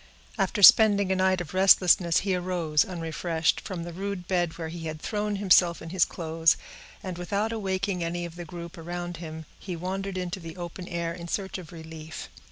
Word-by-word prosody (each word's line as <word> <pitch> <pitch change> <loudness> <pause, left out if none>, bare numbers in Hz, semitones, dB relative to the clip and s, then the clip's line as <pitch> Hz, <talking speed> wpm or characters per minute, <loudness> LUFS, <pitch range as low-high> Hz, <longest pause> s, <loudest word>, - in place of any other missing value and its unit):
After 205 +2 0
spending 200 -2 +8
a - - +2
night 185 -1 +2
of 165 -1 -8
restlessness, 185 -2 +5
he 195 -1 0
arose, 175 -4 +1
unrefreshed, 165 -2 -1
from 180 -3 -5
the 170 0 -7
rude 195 0 -5
bed 175 -3 0
where 165 -2 -5
he 165 0 -6
had 155 0 -5
thrown 210 +3 -2
himself 180 -3 +4
in 165 - -9
his 185 -2 +4
clothes, 165 -1 +1 0.5
and, 185 -2 -5
without 200 +5 -1
awaking 195 -4 -2
any 175 +1 -3
of 170 -1 -9
the 175 - -6
group 170 0 -9
around 175 +1 -5
him, 160 -1 -8
he 185 -3 -5
wandered 190 +3 -4
into 180 +1 -3
the 165 0 -9
open 175 +1 -7
air 170 -1 -3
in 170 0 -8
search 190 +1 -3
of 175 -2 -11
relief. 160 -1 -9
175 Hz, 190 wpm, -27 LUFS, 165-190 Hz, 0.5 s, spending